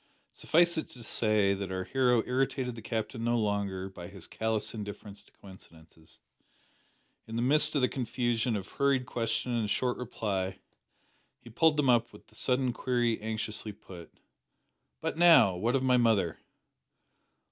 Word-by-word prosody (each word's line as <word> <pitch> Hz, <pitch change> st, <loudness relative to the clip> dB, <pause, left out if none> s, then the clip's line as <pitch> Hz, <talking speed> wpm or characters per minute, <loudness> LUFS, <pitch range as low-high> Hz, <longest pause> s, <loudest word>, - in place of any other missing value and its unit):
Suffice 170 Hz, +1 st, +2 dB
it -, -, -6 dB
to 120 Hz, -, -12 dB
say, 105 Hz, -3 st, +2 dB
that 100 Hz, -1 st, -5 dB
our 95 Hz, 0 st, -2 dB
hero 125 Hz, 0 st, +2 dB
irritated 130 Hz, 0 st, -1 dB
the 115 Hz, -, -9 dB
Captain 115 Hz, +1 st, -4 dB
no 120 Hz, +1 st, +1 dB
longer 100 Hz, -3 st, -1 dB
by 90 Hz, -2 st, -10 dB
his 95 Hz, -3 st, -10 dB
callous 110 Hz, -1 st, -2 dB
indifference 105 Hz, -1 st, -8 dB
to -, -, -22 dB
coincidences. 80 Hz, -4 st, -17 dB, 1.1 s
In 115 Hz, -, -7 dB
the 115 Hz, -, 0 dB
midst 150 Hz, +4 st, +3 dB
of 140 Hz, -, +2 dB
the 125 Hz, -, +4 dB
confusion 120 Hz, -2 st, -1 dB
of 100 Hz, -1 st, -4 dB
hurried 140 Hz, -2 st, +1 dB
question 115 Hz, 0 st, -2 dB
and 115 Hz, -3 st, -1 dB
short 125 Hz, +3 st, 0 dB
reply, 100 Hz, -6 st, -3 dB, 0.8 s
he 120 Hz, -2 st, -14 dB
pulled 160 Hz, +5 st, +3 dB
them 145 Hz, -2 st, +2 dB
up 120 Hz, -1 st, +2 dB
with -, -, -16 dB
the -, -, -20 dB
sudden 125 Hz, -1 st, 0 dB
query 120 Hz, -2 st, 0 dB
anxiously 110 Hz, -1 st, -4 dB
put 95 Hz, -4 st, -13 dB, 0.9 s
"But 160 Hz, -, -3 dB
now, 165 Hz, -, +7 dB
what 115 Hz, +8 st, 0 dB
of 135 Hz, -, +1 dB
my 130 Hz, -1 st, +4 dB
mother?" 110 Hz, -8 st, +2 dB
115 Hz, 160 wpm, -30 LUFS, 100-125 Hz, 1.1 s, now